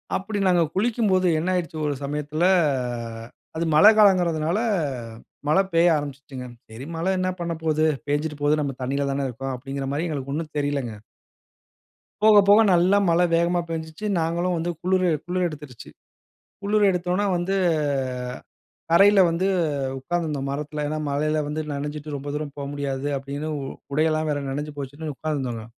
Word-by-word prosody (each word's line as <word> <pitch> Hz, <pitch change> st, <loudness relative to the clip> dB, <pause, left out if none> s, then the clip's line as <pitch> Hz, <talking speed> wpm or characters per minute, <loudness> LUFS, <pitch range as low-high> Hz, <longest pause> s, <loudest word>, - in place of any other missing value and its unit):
அப்படி 205 Hz, +2 st, -3 dB
நாங்க 175 Hz, -2 st, +4 dB
குளிக்கும்போது 205 Hz, -4 st, +2 dB
என்ன 175 Hz, +3 st, -1 dB
ஆயிட்ச்சு 170 Hz, -2 st, -3 dB
ஒரு 145 Hz, -, 0 dB
சமயத்தில 150 Hz, +3 st, -2 dB, 1.1 s
அது 165 Hz, -, 0 dB
மழ 155 Hz, +7 st, +7 dB
காலம்ங்குறதுனால, 175 Hz, -3 st, +3 dB, 0.9 s
மழ 155 Hz, -, +3 dB, 0.2 s
பெய்ய 170 Hz, +1 st, +5 dB
ஆரம்பிச்சுச்சுங்க. 140 Hz, -3 st, -6 dB, 0.2 s
சரி, 115 Hz, +5 st, -9 dB
மழ 165 Hz, +2 st, -3 dB
என்ன 185 Hz, 0 st, 0 dB
பண்ணப்போது, 160 Hz, -2 st, -1 dB, 0.2 s
பெஞ்சுட்டு 150 Hz, +1 st, -1 dB
போது 150 Hz, +1 st, +2 dB
நம்ம 140 Hz, -2 st, -2 dB
தண்ணீல 140 Hz, +2 st, -1 dB
தானே 135 Hz, 0 st, -1 dB
இருக்கோம் 135 Hz, +2 st, -5 dB
அப்டிங்குற 135 Hz, +1 st, -5 dB
மாறி 155 Hz, +5 st, -1 dB
எங்களுக்கு 140 Hz, -3 st, -4 dB
ஒண்ணும் 155 Hz, 0 st, -4 dB
தெரிலங்க. 140 Hz, -5 st, -1 dB, 1.3 s
போக 215 Hz, -1 st, +7 dB
போக 205 Hz, +2 st, +7 dB
நல்லா 180 Hz, +4 st, +4 dB
மழ 170 Hz, +1 st, +3 dB, 0.2 s
வேகமா 175 Hz, +1 st, +2 dB
பெஞ்சுச்சு. 160 Hz, +5 st, -5 dB
நாஙகளும் 170 Hz, +2 st, 0 dB
வந்து 170 Hz, +2 st, -1 dB
குளுரு 185 Hz, 0 st, +2 dB, 0.2 s
குளுர் 180 Hz, 0 st, 0 dB
எடுத்துருச்சு. 150 Hz, -6 st, -10 dB, 0.7 s
குளுர் 210 Hz, +1 st, +2 dB
எடுத்தோன்ன 180 Hz, +3 st, 0 dB
வந்து 180 Hz, +3 st, -1 dB, 1.4 s
கரைல 200 Hz, +3 st, +6 dB
வந்து 170 Hz, +3 st, -1 dB, 0.5 s
உக்காந்துருந்தோம் 150 Hz, -3 st, -2 dB
மரத்துல. 150 Hz, +1 st, -4 dB
ஏன்னா, 155 Hz, +1 st, -2 dB
மழைல 155 Hz, +2 st, 0 dB
வந்து 155 Hz, +1 st, -2 dB
நனஞ்சிட்டு 150 Hz, +1 st, -5 dB
ரொம்ப 140 Hz, +1 st, -6 dB
தூரம் 150 Hz, -1 st, -4 dB
போ -, -, -5 dB
முடியாது 140 Hz, -1 st, -3 dB
அப்படின்னு, 140 Hz, +3 st, -5 dB
உ -, -, -5 dB, 0.3 s
உடை 155 Hz, +2 st, +3 dB
எல்லாம் 155 Hz, 0 st, 0 dB
வேற 145 Hz, -1 st, 0 dB
நனஞ்சு 145 Hz, +2 st, -4 dB
போச்சுன்னு 145 Hz, +3 st, -5 dB
உக்காந்துருந்தோங்க. 130 Hz, -8 st, -3 dB
155 Hz, 145 wpm, -24 LUFS, 145-175 Hz, 1.4 s, மழ